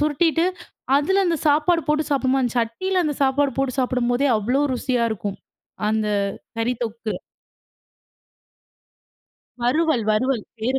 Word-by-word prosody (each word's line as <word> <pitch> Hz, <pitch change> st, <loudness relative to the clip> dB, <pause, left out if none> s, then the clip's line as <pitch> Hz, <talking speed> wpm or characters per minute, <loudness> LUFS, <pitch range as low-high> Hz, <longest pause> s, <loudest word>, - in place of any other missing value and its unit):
சுருட்டிட்டு 320 Hz, +3 st, +2 dB, 0.5 s
அதில 385 Hz, +7 st, +2 dB
அந்த 335 Hz, -1 st, +1 dB
சாப்பாடு 315 Hz, +3 st, +3 dB
போட்டு 300 Hz, +1 st, +2 dB
சாப்பிடோமா 270 Hz, -1 st, +2 dB
அந்த 245 Hz, -1 st, -1 dB
சட்டியில 365 Hz, +12 st, -1 dB
அந்த 295 Hz, -2 st, -1 dB
சாப்பாடு 275 Hz, 0 st, +2 dB
போட்டு 270 Hz, -1 st, -1 dB
சாப்பிடும்போதே 250 Hz, +2 st, +1 dB
அவ்வளோ 245 Hz, +7 st, +1 dB
ருசியா 245 Hz, -1 st, 0 dB
இருக்கும் 200 Hz, -1 st, -5 dB, 0.5 s
அந்த 215 Hz, -1 st, 0 dB, 0.5 s
கறி 240 Hz, +2 st, 0 dB
தொக்கு. 225 Hz, -1 st, -4 dB, 2.5 s
வறுவல் 270 Hz, -1 st, +2 dB
வறுவல் 235 Hz, +1 st, +1 dB
பேரு 255 Hz, +5 st, 0 dB
265 Hz, 115 wpm, -22 LUFS, 235-300 Hz, 2.5 s, சாப்பாடு